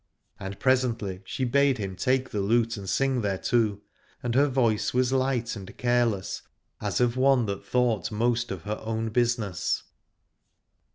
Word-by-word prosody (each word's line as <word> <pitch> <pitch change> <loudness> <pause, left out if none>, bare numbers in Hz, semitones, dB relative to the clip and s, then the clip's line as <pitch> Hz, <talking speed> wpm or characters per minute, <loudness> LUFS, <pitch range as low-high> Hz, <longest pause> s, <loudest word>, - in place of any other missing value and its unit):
And 95 -1 -6
presently 120 -8 +1
she 130 +7 -2
bade 140 +1 +3
him 95 -3 -4
take 130 +7 0
the 105 - -1
lute 115 +3 +2
and 100 -3 -6
sing 135 +6 +1
thereto: 105 +1 0 0.4
and 120 -1 -1
her 140 +3 +4
voice 120 -5 +1
was 130 +1 +2
light 130 -3 0
and 95 -2 -10
careless, 120 -5 0 0.4
as - - -1
of 125 0 +2
one 130 -2 +4
that 100 -2 -4
thought 120 -7 0
most 120 +2 0
of 95 -4 -5
her 105 +1 -4
own 110 0 -2
business. 115 -5 0
115 Hz, 155 wpm, -27 LUFS, 105-125 Hz, 0.4 s, her